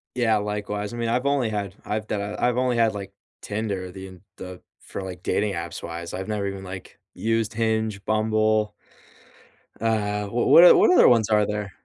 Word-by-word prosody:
Yeah, 115 -3 +2
likewise, 105 +1 -4
I - - -6
mean, 115 -1 -2
I've 125 +3 0
only 140 -5 +1
had 100 -3 -4
I've 110 +1 -3
done 105 0 -3
I've 125 0 0
only 125 -1 +1
had, 115 -2 +3
like, 100 -1 -7 0.3
Tinder, 100 -4 -4
the 95 +1 -9
en 95 -1 -14 0.2
the 90 -1 -9 0.2
for, 95 - -7
like, 90 -1 -8
dating 105 -1 0
apps 85 0 -6
wise. 85 0 -6
I've 95 - -5
never 105 -2 -2
even, 95 0 -6
like, 95 0 -9 0.2
used 115 0 -1
Hinge, 110 -3 -1
Bumble 110 0 +1 1.1
uh, 105 -2 -1
w 100 - -9 0.2
what 170 - +8
o 180 - +9
what - - +5
other 365 - +6
ones 115 -3 +4
are 105 -1 +3
there? 105 -1 -4
105 Hz, 190 wpm, -24 LUFS, 100-110 Hz, 1.1 s, o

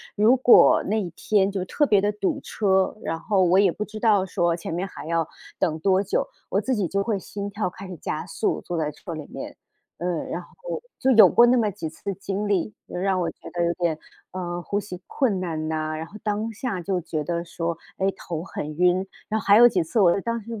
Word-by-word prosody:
如 220 +4 +5
果 250 -1 +6
那 215 +2 0
一 180 - -4
天 200 -2 +2
就 195 -2 -2
特 295 +10 +1
别 205 -6 +4
地 205 +1 +1
堵 290 - -2
车， 190 -6 +1
然 165 - -2
后 190 +4 +1
我 180 +2 +4
也 195 -3 +5
不 210 - -4
知 215 - -9
道 210 -4 +3
说 170 -2 0
前 165 - -5
面 180 +3 -1
还 195 - -9
要 165 0 0 0.3
等 160 -1 0
多 190 +3 +3
久， 195 - -1 0.2
我 195 - +1
自 255 +5 0
己 205 -4 0
就 200 - 0
会 210 0 0
心 200 +1 -6
跳 205 -2 -2
开 190 +2 -10
始 185 - -7
加 155 0 -4
速， 180 +5 -1
坐 175 - -4
在 155 -2 -1
车 160 +3 -8
里 155 -2 -6
面。 - - -7 0.4
呃， 175 -2 -2
然 - - -4
后 - - -7 0.2
就 265 - +2
有 225 -3 +9
过 235 - +5
那 250 +1 +4
么 215 -3 +2
几 180 -5 -5
次 195 +5 -5
经 195 +2 -3
历， 200 0 0
让 190 +1 -1
我 170 -2 -1
觉 - - -12
得 175 -1 0
有 170 - +1
点 170 -3 +1
儿 - - -24 0.4
嗯， 175 -1 -4
呼 200 +3 -2
吸 185 -3 -8
困 225 -9 0
难 160 -4 -3
呐， 155 0 -2
然 160 - -4
后 165 - -18
当 215 +1 -2
下 225 -3 -3
就 180 +1 -1
觉 155 -2 -3
得 170 +1 -2
说， 170 -1 -3 0.2
诶， 195 +1 +1
头 165 -4 -6
很 150 -4 -6
晕， 180 +1 +4 1.5
然 225 -2 -5
190 Hz, 235 characters per minute, -24 LUFS, 170-210 Hz, 1.5 s, 有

